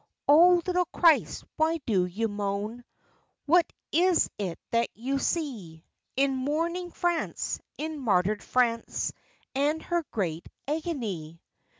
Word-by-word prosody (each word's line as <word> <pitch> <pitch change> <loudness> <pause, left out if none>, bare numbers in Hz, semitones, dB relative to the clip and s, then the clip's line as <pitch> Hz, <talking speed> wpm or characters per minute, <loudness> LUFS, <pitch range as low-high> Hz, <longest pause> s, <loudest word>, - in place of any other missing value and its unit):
Oh 345 +5 +7
little 360 -1 +1
Christ, 330 -3 +3
why 320 +1 +2
do 190 -5 +2
you 215 +6 -1
moan, 205 +3 -3 0.6
What 340 +3 +4 0.2
is 350 +2 +3
it 185 -5 -3
that 235 0 +2
you 270 +4 -2
see 220 - -3 0.3
In 270 0 +2
mourning 330 +7 -1
France, 345 -1 -1 0.2
in 310 0 -4
martyred 205 -4 +1
France, 235 -2 0 0.4
And 290 +4 +1
her 345 -1 0
great 170 -6 -3 0.2
agony? 230 - -3
270 Hz, 115 wpm, -28 LUFS, 205-330 Hz, 0.6 s, Oh